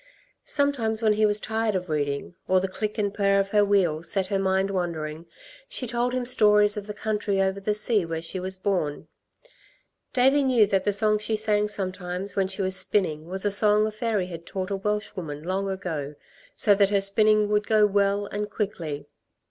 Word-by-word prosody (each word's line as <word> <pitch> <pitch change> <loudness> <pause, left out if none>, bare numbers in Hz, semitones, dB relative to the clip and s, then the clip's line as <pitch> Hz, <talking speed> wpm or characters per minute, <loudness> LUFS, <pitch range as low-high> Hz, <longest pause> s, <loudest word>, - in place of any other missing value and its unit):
Sometimes 240 -6 0
when 215 -1 +4
he 215 0 +3
was 205 0 +1
tired 220 -1 -1
of 180 -1 -2
reading, 145 0 -2
or 185 0 +4
the 190 - -2
click 210 +3 -4
and 205 -2 -1
purr 200 -1 +2
of 195 0 -1
her 210 0 +3
wheel 190 -6 +2
set 190 +3 0
her 195 0 -1
mind 190 0 +1
wandering, 165 -3 -4 0.4
she - - -1
told 240 +1 -1
him 255 -1 -2
stories 210 -3 +4
of 210 -1 -6
the 210 - -5
country 210 -2 -1
over 190 0 0
the 210 +1 -1
sea 210 -1 +1
where 165 -1 -4
she 185 +3 -4
was 190 +1 -2
born. 185 -7 -2 1.0
Davey 270 +2 +3
knew 250 -5 +4
that 195 -2 0
the 205 - +2
song 215 +1 +2
she 220 +1 -2
sang 210 -1 +1
sometimes 185 -1 -4
when 195 -1 +1
she 190 +1 -3
was 190 0 0
spinning 185 -5 0
was 190 +3 -2
a 205 - +2
song 210 +1 +4
a 215 - -2
fairy 215 -3 -1
had 170 -2 -8
taught 190 0 -4
a - - 0
Welshwoman 190 -7 -4
long 190 +3 -2
ago 160 -7 -4 0.4
so 205 - +4
that 200 -1 +3
her 200 -1 +2
spinning 210 +2 +3
would 210 0 +1
go 215 -1 +4
well 200 0 +1
and 210 +1 -4
quickly. 170 -9 -4
200 Hz, 200 wpm, -25 LUFS, 185-210 Hz, 1.0 s, when